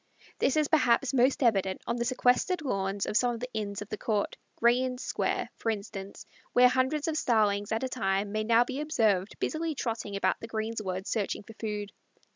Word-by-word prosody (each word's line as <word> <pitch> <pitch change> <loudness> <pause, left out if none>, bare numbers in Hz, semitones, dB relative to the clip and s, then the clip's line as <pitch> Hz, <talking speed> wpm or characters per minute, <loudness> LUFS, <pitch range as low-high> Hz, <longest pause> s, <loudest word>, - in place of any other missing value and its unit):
This 275 - +2
is 305 -1 +3
perhaps 275 -4 +3
most 260 +2 +3
evident 195 -5 +1
on 235 - -1
the 235 - -1
sequestered 255 +7 +2
lawns 195 -6 -1
of - - -4
some 245 +1 +3
of - - -7
the 250 +1 -6
inns 205 -2 -3
of 210 - -18
the 215 - -5
court, 210 -3 -1 0.2
Gray's 240 +2 +4
Inn 255 -1 -2
Square, - - -2
for 230 - -2
instance, 200 -2 -5 0.3
where 250 0 +7
hundreds 260 +4 0
of 320 - 0
Starlings 205 -5 +2
at 220 +3 0
a - - +1
time 200 -5 -1
may 215 +1 -1
now 230 +2 +5
be 260 +3 -4
observed 220 - +1
busily 320 -1 -2
trotting 225 -5 -3
about 195 - +1
the 230 - -7
greensward 215 -4 -3
searching 210 -3 -2
for 225 - -12
food. 210 -2 -4
230 Hz, 200 wpm, -29 LUFS, 205-255 Hz, 0.3 s, where